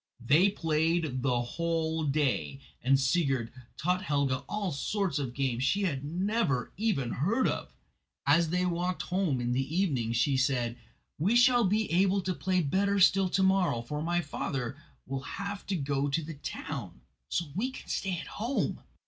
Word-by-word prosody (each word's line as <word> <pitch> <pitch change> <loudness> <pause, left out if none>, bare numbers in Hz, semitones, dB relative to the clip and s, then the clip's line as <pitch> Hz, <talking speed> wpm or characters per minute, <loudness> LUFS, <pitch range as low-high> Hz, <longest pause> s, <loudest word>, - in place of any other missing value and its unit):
They 150 +11 +4
played 160 -6 0
the 125 -2 +1
whole 160 +3 -1
day, 140 -1 0 0.2
and 135 +2 +4
Sigurd 135 -5 +1 0.3
taught 180 +5 0
Helga 140 -8 +1
all 210 -3 -2
sorts 175 +2 -1
of 125 -3 -4
games 130 -3 0
she 200 +9 +2
had 140 -8 -1
never 175 - 0
even 185 - 0
heard 210 - +1
of. - - -4 0.5
As 160 +4 +4
they 180 +2 +1
walked 180 +1 -1
home 180 -8 0
in 120 0 -1
the 135 +5 -1
evening 135 - +1
she 130 +3 +2
said: 130 -3 +1 0.4
"We 195 +10 +2
shall 245 -1 +5
be 210 +3 +1
able 190 +3 +3
to 185 0 -1
play 185 +1 0
better 200 +7 +1
still 190 0 +5
to 190 +2 +2
morrow, 185 -11 +2
for 150 +5 -4
my 175 +2 +1
father 135 -4 -3 0.3
will 135 0 -4
have 200 +4 -6
to 200 - 0
go 140 -2 0
to 160 +4 0
the 160 +2 -6
town, 140 - -6 0.3
so 170 - 0
we 220 - -1
can 265 - -10
stay 190 -2 -1
at 160 - -6
home." 230 - -2
160 Hz, 170 wpm, -30 LUFS, 135-190 Hz, 0.5 s, shall